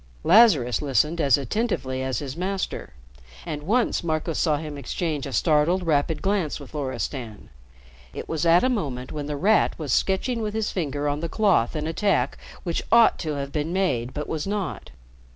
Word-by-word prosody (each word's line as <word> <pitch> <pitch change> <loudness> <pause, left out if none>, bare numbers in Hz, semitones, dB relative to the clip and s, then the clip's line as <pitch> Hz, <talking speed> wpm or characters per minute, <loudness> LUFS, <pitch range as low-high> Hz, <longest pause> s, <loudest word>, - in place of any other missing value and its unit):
Lazarus 175 - +5
listened 150 +4 +1
as 140 -5 +4
attentively 135 - -2
as 130 -1 -2
his 140 -2 -5
master, 190 +2 -3 0.5
and 150 - -4
once 225 +8 +1
Marco 160 0 -1
saw 155 -1 +1
him 150 -1 -6
exchange 145 +1 -3
a - - -6
startled, 160 - +2
rapid 155 0 0
glance 195 -7 0
with 140 0 -12
Loristan. 130 -5 -5 0.6
It - - -7
was 160 -2 -2
at 170 +1 +5
a - - +4
moment 140 - -2
when 145 -1 -5
The 150 -1 -3
Rat 210 +8 +3
was 150 -7 -2
sketching 230 +5 0
with 215 -1 -3
his 220 -1 -1
finger 145 -5 -2
on 145 0 -1
the 165 +1 -3
cloth 195 - +2
an 150 0 -2
attack 195 +5 0 0.2
which 170 -3 -2
ought 230 0 +6
to 155 -3 -3
have 140 0 -4
been 150 +2 -2
made 130 -11 0
but 150 +2 -5
was 160 +2 -3
not. 205 -2 -3
155 Hz, 180 wpm, -24 LUFS, 140-190 Hz, 0.6 s, ought